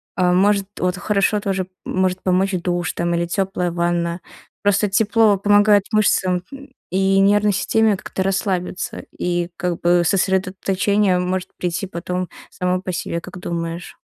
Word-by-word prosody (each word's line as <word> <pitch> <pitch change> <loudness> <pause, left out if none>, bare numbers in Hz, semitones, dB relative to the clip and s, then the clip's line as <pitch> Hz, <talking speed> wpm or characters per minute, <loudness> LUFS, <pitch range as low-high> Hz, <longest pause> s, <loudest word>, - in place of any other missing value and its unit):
А 180 -1 +2
может, 200 +2 +3
вот 180 0 0
хорошо 200 +2 +1
тоже 190 -2 -2 0.2
может 185 0 0
помочь 190 +1 +2
душ 175 0 -1
там 170 0 -1
или 170 0 0
тёплая 180 0 -1
ванна. 170 0 -1 0.4
Просто 205 0 +2
тепло 215 0 +3
помогает 205 0 +4
мышцам 190 -4 +2
т 275 +8 -13 0.2
и 195 +1 +2
нервной 205 +1 +4
системе 220 +2 +2
как-то 190 - -4
расслабиться, 190 -1 -2
и, 175 -1 -1
как 180 -2 -2
бы, 175 0 +4
сосредоточение 190 +1 +1
может 180 0 -2
прийти 175 +1 -2
потом 180 0 -4 0.2
само 180 0 -1
по 185 - -4
себе, 170 -1 -3
как 180 - -10
думаешь? 170 0 -5
185 Hz, 145 wpm, -20 LUFS, 175-200 Hz, 0.4 s, помогает